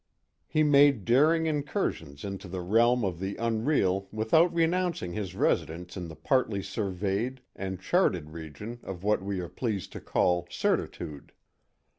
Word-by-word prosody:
He 155 - +2
made 140 -7 +5
daring 155 +7 +4
incursions 145 - -2
into 100 -1 -6
the 90 0 -4
realm 115 +5 +3
of 90 -3 -3
the 95 +1 -3
unreal 110 -4 +1
without 115 +11 +3
renouncing 170 - 0
his 95 -2 -4
residence 90 +1 0
in 90 -2 -5
the 80 - -9
partly 110 - +1
surveyed 100 +6 -2
and 95 -1 -4
charted 95 - +1
region 85 +9 -8
of 95 -2 -7
what 105 0 +2
we 100 -1 -3
are 90 - -5
pleased 100 +1 -3
to - - -8
call 90 -1 +1
certitude. 75 -4 -2
100 Hz, 145 wpm, -28 LUFS, 90-130 Hz, -, made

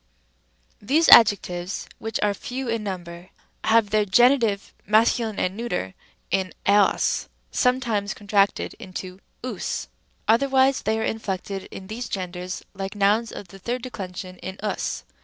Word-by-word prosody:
Rem. 205 - -18
These 320 +6 +4
adjectives, 190 -4 +5
which 225 0 -3
are 205 -1 +2
few 255 +5 -5
in 230 -1 -1
number, 175 -2 -6 0.4
have 220 -2 +4
their 215 0 +3
G. 225 +5 +6 0.6
mase. 220 +3 +4
and 215 -5 -2
neut. 180 - -3 0.4
in 190 0 0
eos, 200 0 +3 0.2
sometimes 235 -6 +1
contracted 200 -1 +1
into 185 0 -7 0.2
ovs; 255 - -4 0.4
otherwise 265 +3 +4
they 220 +1 0
are - - -1
inflected 195 -3 -3
in 190 - -9
these 225 +4 -6
genders 180 -1 -5
like 195 +1 -5
nouns 210 +3 +2
of 190 - -9
the 195 - -12
third 240 +5 -3
declension 185 -6 -7
in 190 +1 -7
οὖς, 210 - -2
G. - - -36
205 Hz, 140 wpm, -24 LUFS, 190-230 Hz, 0.6 s, G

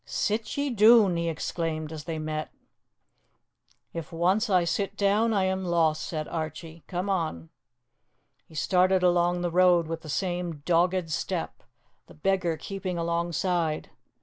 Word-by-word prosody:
"Sit 215 +5 -2
ye 285 -1 0
doon," 215 -4 +6
he 170 0 -1
exclaimed, 160 -1 -3
as 155 -2 -7
they 165 -1 -3
met. 155 0 -4 1.4
"If 165 -2 -6
once 185 +7 +1
I 185 -3 +4
sit 195 +4 -2
down 210 +3 +2
I 200 -3 +2
am 190 0 -1
lost," 165 -3 +1
said 155 -2 -4
Archie. 160 0 -6
"Come 180 +1 -3
on." 160 - -2 1.0
He 160 - -16
started 185 +5 +2
along 175 0 +3
the 175 -1 -1
road 180 -1 +4
with 165 +1 -5
the 155 - -10
same 175 -2 -3
dogged 175 0 +2
step, 170 +2 -3 0.5
the - - -15
beggar 175 0 0
keeping 190 -1 -5
alongside. 170 -1 -1
175 Hz, 145 wpm, -27 LUFS, 160-190 Hz, 1.4 s, doon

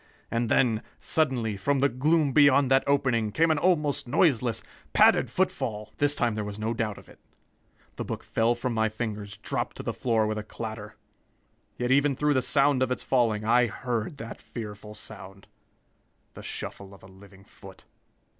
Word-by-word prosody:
And 115 0 0
then, 115 -4 +2 0.2
suddenly, 125 -9 0
from 140 +9 0
the 140 +1 +3
gloom 145 +3 +1
beyond 140 -2 +5
that 135 0 +5
opening, 130 -6 +1
came 165 +7 +3
an 155 - +1
almost 150 -5 +1
noiseless, 120 - +2 0.3
padded - - +5
footfall!" 125 - -2
This 145 0 +2
time 120 -2 +1
there 105 0 -3
was 105 0 -6
no 110 +2 -2
doubt 110 -3 -2
of - - -14
it. - - -17 0.8
The - - -3
book - - -5
fell 115 +1 +1
from 120 +1 -3
my 110 -1 +1
fingers, 110 -2 -5
dropped - - -3
to - - -6
the - - -3
floor 115 -3 +1
with 110 0 -2
a - - -5
clatter. 110 -1 -7 0.8
Yet 125 +1 -1
even 140 +1 +3
through 150 +2 +1
the 130 - +2
sound 140 0 +2
of 130 - +2
its 125 - -2
falling, 115 -4 +1
I 120 +2 +4
heard 120 +3 -3
that 115 +1 -8
fearful 105 -2 -8
sound 95 -2 -11 0.9
the - - -10
shuffle 100 0 -7
of - - -20
a - - -12
living 95 0 -17
foot! 95 -1 -15
120 Hz, 180 wpm, -27 LUFS, 105-140 Hz, 0.9 s, beyond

